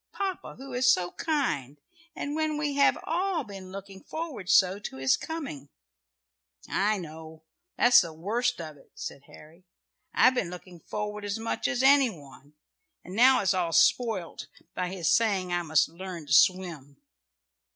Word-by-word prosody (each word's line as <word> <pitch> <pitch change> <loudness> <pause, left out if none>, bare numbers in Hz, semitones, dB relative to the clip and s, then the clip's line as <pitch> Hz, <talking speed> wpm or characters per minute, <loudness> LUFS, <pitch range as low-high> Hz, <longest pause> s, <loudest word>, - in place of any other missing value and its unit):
"Papa 385 -2 -4
who 270 0 -9
is 250 0 +4
so 180 -6 0
kind, 150 - -2 0.4
and 290 +1 -4
when 310 -1 -1
we 295 -1 -1
have 280 0 +4
all 355 0 -1
been 195 -4 -10
looking 195 0 -9
forward 310 - -6
so 195 0 +4
to 205 - -7
his 135 0 +3
coming." 270 - -7 1.0
"I 210 +2 +1
know 160 -2 -10 0.3
that's 245 0 +7
the 170 -3 -5
worst 225 +9 -1
of 155 -3 -8
it," - - -23
said 140 - -8
Harry. 160 +4 -16 0.5
"I've 255 - +5
been 220 -9 -1
looking 180 0 -11
forward 210 +3 -5
as 205 +1 -3
much 225 +1 -2
as 260 -2 -1
any 275 -1 +6
one, 145 -5 -14 0.5
and 185 - -9
now 255 +3 +6
it's 195 - +2
all 175 -3 -1
spoilt 220 -7 +1 0.3
by 180 -1 -2
his 180 -4 -3
saying 195 -6 +1
I 175 - +1
must 160 -2 +2
learn 170 -1 -8
to 140 - -2
swim." 155 -1 +2
195 Hz, 160 wpm, -27 LUFS, 165-250 Hz, 1.0 s, that's